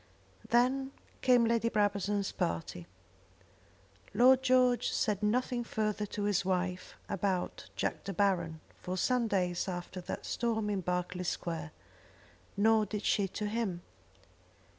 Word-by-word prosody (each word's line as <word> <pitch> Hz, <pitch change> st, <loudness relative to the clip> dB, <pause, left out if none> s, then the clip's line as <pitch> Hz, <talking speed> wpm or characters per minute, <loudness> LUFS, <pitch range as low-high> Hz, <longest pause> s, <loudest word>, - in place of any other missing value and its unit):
Then 265 Hz, +3 st, +2 dB, 0.3 s
came 245 Hz, -2 st, +5 dB
Lady 230 Hz, 0 st, +2 dB
Brabazon's 205 Hz, -2 st, 0 dB
party. 85 Hz, +1 st, -3 dB, 1.3 s
Lord 255 Hz, +2 st, +6 dB
George 255 Hz, -1 st, +3 dB
said 210 Hz, -3 st, 0 dB
nothing 240 Hz, +3 st, 0 dB
further 215 Hz, -2 st, -2 dB
to 205 Hz, -, -4 dB
his 200 Hz, -2 st, +1 dB
wife 185 Hz, -1 st, -2 dB
about 190 Hz, -2 st, -2 dB
Jack -, -, -2 dB
De 195 Hz, -, -3 dB
Baron 170 Hz, -5 st, 0 dB, 0.2 s
for 185 Hz, +1 st, -3 dB
some 250 Hz, +4 st, +2 dB
days 180 Hz, -3 st, 0 dB
after 180 Hz, 0 st, -5 dB
that -, -, -6 dB
storm 220 Hz, -3 st, -1 dB
in 195 Hz, -2 st, -1 dB
Berkeley 180 Hz, +1 st, -2 dB
Square, 165 Hz, -3 st, -3 dB, 0.9 s
nor 220 Hz, +1 st, +4 dB
did 210 Hz, +1 st, -4 dB
she 200 Hz, -2 st, +2 dB
to 210 Hz, +3 st, -4 dB
him. 205 Hz, -5 st, -2 dB
205 Hz, 125 wpm, -32 LUFS, 180-230 Hz, 1.3 s, Lord